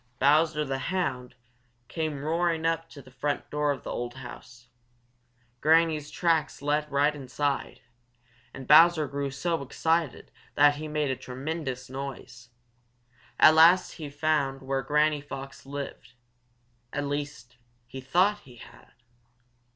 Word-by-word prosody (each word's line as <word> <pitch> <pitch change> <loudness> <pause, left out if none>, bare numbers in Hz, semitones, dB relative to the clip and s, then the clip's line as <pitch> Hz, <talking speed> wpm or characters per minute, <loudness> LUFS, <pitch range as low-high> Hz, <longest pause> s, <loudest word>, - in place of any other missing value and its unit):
Bowser 150 +2 +3
the 135 -1 -3
Hound 135 -10 -2 0.5
came 155 -4 -3
roaring 165 +1 0
up 165 0 -1
to 140 -4 -12
the 130 - -17
front 145 +2 -3
door 150 0 0
of 140 - -5
the - - -6
old 120 +1 -4
house. 125 -1 -11 0.9
Granny's 155 -1 +3
tracks 160 -5 0
led 150 +1 0
right 145 +2 +2
inside, 135 -1 -3 0.7
and 130 0 -10
Bowser 160 0 +6
grew 140 0 -3
so 160 +4 -2
excited 160 +2 -1 0.2
that 145 0 +5
he 155 +1 -6
made 150 -2 -1
a - - -1
tremendous 130 0 -5
noise. 130 -3 -8 0.9
At 155 - +8
last 170 +3 +6
he 160 - -8
had 145 0 -10
found 145 -3 0
where 135 0 -1
Granny 150 +1 +1
Fox 135 -1 -9
lived; 140 -2 -7 0.8
at 145 0 -3
least 145 -4 -5 0.3
he 130 +2 -9
thought 185 +10 +2
he 130 -11 -16
had. 115 - -16
145 Hz, 135 wpm, -27 LUFS, 135-155 Hz, 0.9 s, At